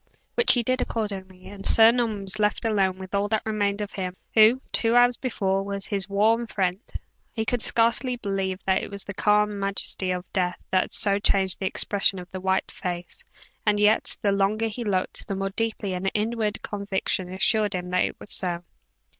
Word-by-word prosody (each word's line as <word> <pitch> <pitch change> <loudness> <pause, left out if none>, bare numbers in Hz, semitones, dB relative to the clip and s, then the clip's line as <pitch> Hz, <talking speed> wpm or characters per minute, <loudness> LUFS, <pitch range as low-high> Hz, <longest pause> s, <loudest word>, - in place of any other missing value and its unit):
Which 475 - +5
he 240 - +1
did, 255 +2 +1
accordingly; 190 -4 -3
and 200 -1 -10
Sir 225 0 +7
Norman 230 -4 -1
was 195 +2 -1
left 210 +2 0
alone 195 -4 +1
with 190 0 -10
all 200 +1 +1
that 220 0 -1
remained 205 -2 -1
of 205 - -4
him 185 -2 -5 0.2
who, 220 +3 +6
two 230 0 +2
hours 245 0 +5
before, 195 -7 -1
was 200 0 -5
his 195 -2 -3
warm 220 +4 +2
friend. 190 -3 -1 0.5
He 220 -1 -2
could 245 0 -1
scarcely 235 +3 +2
believe 195 -4 -2
that 190 0 +2
it - - -6
was 200 -1 -6
the 200 - -7
calm 210 +1 +2
majesty 195 -1 -2
of 180 0 -2
death 180 -2 0
that 185 - +1
so 200 -1 +2
changed 190 -2 +2
the 190 - -1
expression 195 0 +1
of 180 0 -9
that 185 - -6
white 190 0 0
face, 175 -1 -6 0.4
and 210 -1 +2
yet, 210 +1 +3
the 200 - +3
longer 200 +3 +1
he 235 +3 -5
looked, 190 -4 -2
the 200 - -3
more 195 0 -2
deeply 215 -2 -2
an 180 +1 -3
inward 215 +1 -1
conviction 195 -2 -2
assured 210 +2 +2
him 180 0 -4
that 180 0 +2
it - - -6
was - - -3
so. 175 -2 -1
200 Hz, 195 wpm, -25 LUFS, 190-220 Hz, 0.5 s, Sir